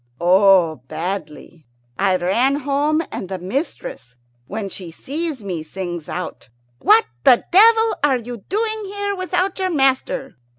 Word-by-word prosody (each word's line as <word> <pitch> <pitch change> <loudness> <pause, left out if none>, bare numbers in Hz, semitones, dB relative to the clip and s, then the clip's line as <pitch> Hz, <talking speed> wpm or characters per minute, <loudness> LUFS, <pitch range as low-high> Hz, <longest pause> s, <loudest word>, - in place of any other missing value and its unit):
"Oh, 180 -2 +4
badly. 160 -1 -6 0.3
I 195 -1 +3
ran 215 +10 +2
home, 290 +3 0
and 185 - -6
the 190 - -3
mistress, 180 - -5 0.3
when 210 -1 -4
she 185 -2 -8
sees 285 - -5
me, 180 -5 -4
sings 175 0 -6
out, 180 -10 -6 0.3
'What 440 +2 +5 0.2
the 255 -4 +5
devil 445 +4 +6
are 275 -3 +3
you 240 0 -7
doing 435 +1 -1
here 405 0 -3
without 370 +1 -1
your 375 -1 0
master? 270 -3 0
245 Hz, 135 wpm, -20 LUFS, -, 0.3 s, devil